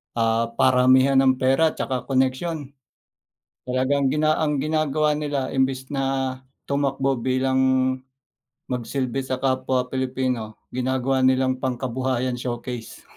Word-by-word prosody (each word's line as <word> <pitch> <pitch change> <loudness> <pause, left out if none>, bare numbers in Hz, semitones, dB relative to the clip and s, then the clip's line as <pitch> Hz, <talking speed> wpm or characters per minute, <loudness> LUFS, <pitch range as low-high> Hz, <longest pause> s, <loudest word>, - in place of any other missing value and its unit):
ah, 115 0 +1
paramihan 130 +2 +5
ng 130 -1 +4
pera 135 +5 +3
at - - -15
saka 130 -2 -2
koneksyon. 135 +3 -1 1.0
Talagang 135 +2 +1
gina 155 +2 +2
ang 150 -2 +1
ginagawa 155 -1 +1
nila 145 -3 -2
imbes 130 0 0
na 135 -1 -1 0.3
tumakbo 135 -2 0
bilang 130 +1 +1 1.1
magsilbi 125 +1 -2
sa 130 - -1
kapwa 130 -1 0
Pilipino 130 -4 -2 0.2
ginagawa 130 +1 0
nilang 130 0 +3
pangkabuhayan 130 0 -2
showcase. 120 -1 -6
130 Hz, 110 wpm, -23 LUFS, 130-135 Hz, 1.1 s, paramihan